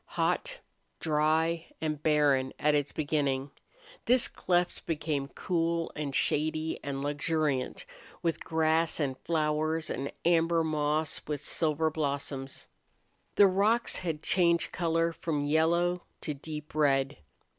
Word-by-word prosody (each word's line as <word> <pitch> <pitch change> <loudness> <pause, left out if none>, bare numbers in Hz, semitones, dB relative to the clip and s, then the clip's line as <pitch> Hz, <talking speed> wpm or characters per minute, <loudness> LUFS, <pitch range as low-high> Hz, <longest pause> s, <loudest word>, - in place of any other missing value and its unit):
Hot, - - 0 0.4
dry, 160 +2 +1
and 155 -2 -2
barren 145 -4 +2
at 150 0 +2
its 145 -1 +1
beginning, 140 -3 -1 0.5
this 250 0 +4
cleft 175 -1 0
became 150 -3 -1
cool 165 +2 -1
and 145 -2 -3
shady 155 +1 0
and 140 -1 -3
luxuriant 145 - -1 0.4
with 165 -2 -1
grass 160 +1 +1
and 135 -4 0
flowers 155 0 0
and 135 +3 -3
amber 165 -1 +3
moss 155 0 0
with 150 -1 -4
silver 160 -1 +1
blossoms. 140 -3 -4 0.7
The 205 - +7
rocks 205 +5 +2
had 160 -4 -3
changed 170 -2 +2
color 165 -1 0
from 155 -3 -2
yellow 170 +4 +2 0.2
to 150 - -2
deep 150 +1 -8
red. 135 -3 +2
155 Hz, 120 wpm, -30 LUFS, 145-165 Hz, 0.7 s, The